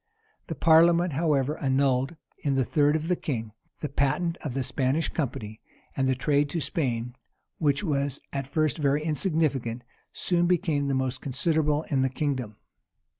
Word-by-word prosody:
The 165 Hz, -, -4 dB
parliament, 165 Hz, +2 st, +5 dB
however, 150 Hz, -1 st, +1 dB
annulled, 135 Hz, +1 st, +1 dB, 0.2 s
in 140 Hz, -2 st, 0 dB
the 130 Hz, -2 st, +2 dB
third 150 Hz, +1 st, +3 dB
of 160 Hz, +1 st, -2 dB
the 180 Hz, -, +2 dB
king, 115 Hz, -10 st, -4 dB, 0.3 s
the 150 Hz, -, -1 dB
patent 150 Hz, +5 st, 0 dB
of 135 Hz, -5 st, -6 dB
the 135 Hz, -, 0 dB
Spanish 135 Hz, +5 st, 0 dB
company; 110 Hz, -7 st, -4 dB, 0.3 s
and 135 Hz, -1 st, +1 dB
the 130 Hz, -, +2 dB
trade 145 Hz, +3 st, +1 dB
to 170 Hz, -, -2 dB
Spain, 125 Hz, -8 st, -2 dB, 0.5 s
which 145 Hz, +1 st, +1 dB
was 140 Hz, -5 st, -1 dB
at 135 Hz, -2 st, -3 dB
first 155 Hz, +2 st, 0 dB
very 145 Hz, +1 st, +1 dB
insignificant, 150 Hz, -, 0 dB, 0.3 s
soon 175 Hz, -1 st, +1 dB
became 165 Hz, -6 st, +1 dB
the 135 Hz, -, 0 dB
most 130 Hz, -1 st, -1 dB
considerable 150 Hz, +2 st, 0 dB
in 135 Hz, -3 st, +2 dB
the 130 Hz, -, +2 dB
kingdom. 130 Hz, -5 st, -2 dB
145 Hz, 160 wpm, -27 LUFS, 130-160 Hz, 0.5 s, parliament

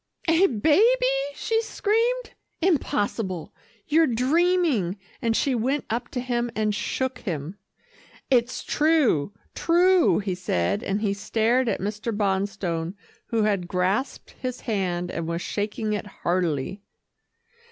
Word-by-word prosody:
"A 330 Hz, +4 st, +5 dB
baby," 345 Hz, -, +3 dB
she 450 Hz, +7 st, 0 dB
screamed 460 Hz, +3 st, 0 dB, 0.3 s
"impossible 225 Hz, -, -1 dB, 0.3 s
you're 320 Hz, +2 st, +4 dB
dreaming," 270 Hz, -, +2 dB, 0.2 s
and 230 Hz, -1 st, +1 dB
she 275 Hz, -, +1 dB
went 260 Hz, +4 st, 0 dB
up 240 Hz, +1 st, -2 dB
to 250 Hz, -, -3 dB
him, 240 Hz, -1 st, -1 dB
and 215 Hz, -1 st, +1 dB
shook 255 Hz, +3 st, -2 dB
him. 170 Hz, -, -5 dB, 0.7 s
"It's 240 Hz, -2 st, +2 dB
true, 295 Hz, -, +2 dB, 0.2 s
true," 355 Hz, +1 st, +4 dB
he 195 Hz, -2 st, -1 dB
said, 180 Hz, -, -1 dB
and 200 Hz, 0 st, -2 dB
he 205 Hz, -3 st, +1 dB
stared 225 Hz, +4 st, +1 dB
at -, -, -1 dB
Mr. 210 Hz, +4 st, -3 dB
Bonstone 190 Hz, -4 st, -1 dB, 0.3 s
who 225 Hz, -2 st, +1 dB
had 200 Hz, -4 st, 0 dB
grasped 185 Hz, +9 st, -1 dB
his 255 Hz, -1 st, -5 dB
hand 180 Hz, -5 st, -2 dB
and 165 Hz, -1 st, -4 dB
was 170 Hz, +1 st, -2 dB
shaking 210 Hz, +1 st, -2 dB
it 210 Hz, 0 st, -3 dB
heartily. 175 Hz, -2 st, -2 dB
225 Hz, 125 wpm, -25 LUFS, 195-285 Hz, 0.7 s, A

